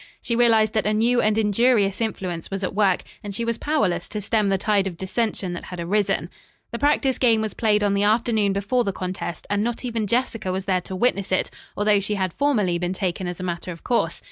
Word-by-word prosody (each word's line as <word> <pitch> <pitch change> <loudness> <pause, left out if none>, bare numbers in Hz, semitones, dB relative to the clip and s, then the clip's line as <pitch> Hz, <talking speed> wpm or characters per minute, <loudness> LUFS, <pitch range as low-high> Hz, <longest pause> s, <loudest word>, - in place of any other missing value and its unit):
She 235 - -2
realized 225 -3 +4
that 215 -2 +1
a 215 - +1
new 240 +3 +3
and 215 0 +2
injurious 215 -1 +2
influence 185 -6 -3
was 195 0 -4
at 185 - -2
work, 195 -2 +2 0.2
and 200 -1 -5
she 230 - -1
was 230 0 -2
powerless 200 - 0
to 210 - -3
stem 210 0 +1
the 195 - +2
tide 200 0 +1
of 175 -3 -6
dissension 190 -1 -2
that 175 - -6
had 180 - -8
arisen. 185 -2 0 0.4
The 235 - -4
practice 285 -2 +2
game 230 -3 +4
was 220 -1 -2
played 210 -2 +2
on 200 -1 +2
the 200 - +1
afternoon 215 -1 +2
before 200 +6 0
the 200 -3 -2
contest, 185 -2 -5
and 205 0 0
not 240 +2 -3
even 225 -3 -2
Jessica 225 -4 -1
was 190 +1 -3
there 185 -2 +1
to 190 - -7
witness 200 -2 0
it, 185 - 0 0.3
although 205 0 +3
she 205 +1 -1
had 190 -3 -1
formerly 210 -12 +1
been 180 +1 -1
taken 185 -1 -2
as 175 0 -5
a - - -5
matter 175 0 -4
of 165 - -10
course. 240 -2 0
205 Hz, 230 wpm, -23 LUFS, 185-230 Hz, 0.4 s, realized